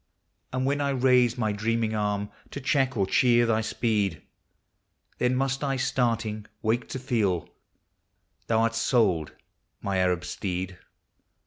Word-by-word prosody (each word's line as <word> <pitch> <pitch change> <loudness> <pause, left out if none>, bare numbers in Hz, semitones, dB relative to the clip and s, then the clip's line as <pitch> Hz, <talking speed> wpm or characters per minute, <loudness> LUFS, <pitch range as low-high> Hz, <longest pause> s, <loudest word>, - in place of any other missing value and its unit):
And 130 0 -1
when 140 +2 +1
I 140 - +1
raise 125 -2 +3
my 110 -3 0
dreaming 110 +1 0
arm 105 -1 -1 0.2
to - - -6
check 135 -2 +1
or 100 - +2
cheer 120 +4 +4
thy 110 -1 +2
speed, 105 -6 -1 1.0
Then 125 +1 +2
must 135 +1 0
I, 135 -1 0
starting, 115 -5 -1 0.2
wake 115 +2 0
to - - -4
feel, 110 - 0 0.5
— - - -45
thou 115 0 +3
'rt 115 - 0
sold, 110 - +1 0.5
my 100 -1 -2
Arab 90 -1 +1
steed! 90 0 -4
115 Hz, 140 wpm, -27 LUFS, 105-125 Hz, 1.0 s, cheer